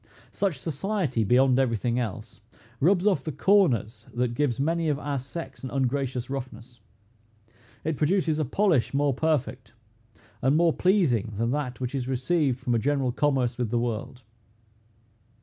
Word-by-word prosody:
Such 195 -7 -1
society, 160 - -1
beyond 125 +4 +4
every 120 -4 +1
thing 120 +3 -1
else, 110 -2 -5 0.4
rubs 180 +5 +3
off 190 -10 +2
the 155 - -3
corners 140 - +2
that 120 -1 0
gives 130 -3 0
many 165 +3 0
of 145 - +1
our 145 -1 -3
sex 135 -1 -8
an 130 - -4
ungracious 130 -1 -1
roughness. 125 -2 -7 1.0
It 155 -2 -2
produces 160 -1 +1
a 155 - +1
polish 145 - +1
more 140 0 +2
perfect, 135 -6 -1 0.7
and 135 +4 +3
more 170 -1 +4
pleasing 140 - +2
than 115 +2 0
that 135 -3 -3
which 125 0 -3
is 130 -3 -2
received 135 +1 0
from 120 - -1
a 115 - +2
general 135 0 0
commerce 130 -3 0
with 120 -3 -1
the 120 - 0
world. 120 +2 -3
135 Hz, 155 wpm, -26 LUFS, 120-155 Hz, 1.0 s, beyond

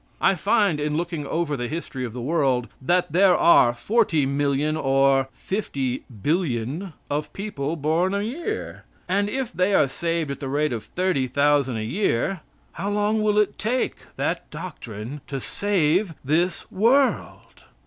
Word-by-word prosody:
I 195 - +4
find, 200 -3 +2
in 150 0 -1
looking 165 -4 -3
over 160 -3 -1
the 120 -2 -3
history 140 -3 -5
of 115 - -7
the 125 -1 -5
world, 135 -5 +1
that 175 +5 +1
there 185 +2 +5
are 125 -7 +6
40,000,000 145 - +1
or 135 -2 +3
50,000,000,000 140 - -2 0.2
of 150 +1 -2
people 165 -7 -3
born 165 +5 +1
a 200 - 0
year, 340 - -4 0.2
and 200 +3 +1
if 260 -2 -3
they 185 +4 +2
are - - +4
saved 165 +1 -2
at 140 - -5
the 135 - -4
rate 145 0 0
of 115 - -5
30,000 140 -6 +1
a 110 - -3
year, 120 - +1
about 195 - -6 0.3
how 200 - -4
long 210 +1 +1
will 210 -1 +2
it 210 -1 +1
take 245 +4 0 0.2
that - - -2
doctrine 145 - -7
to 135 -1 -4
save 180 - 0
this 165 +5 +1
world? 255 +7 +1
155 Hz, 150 wpm, -24 LUFS, 135-195 Hz, 0.3 s, are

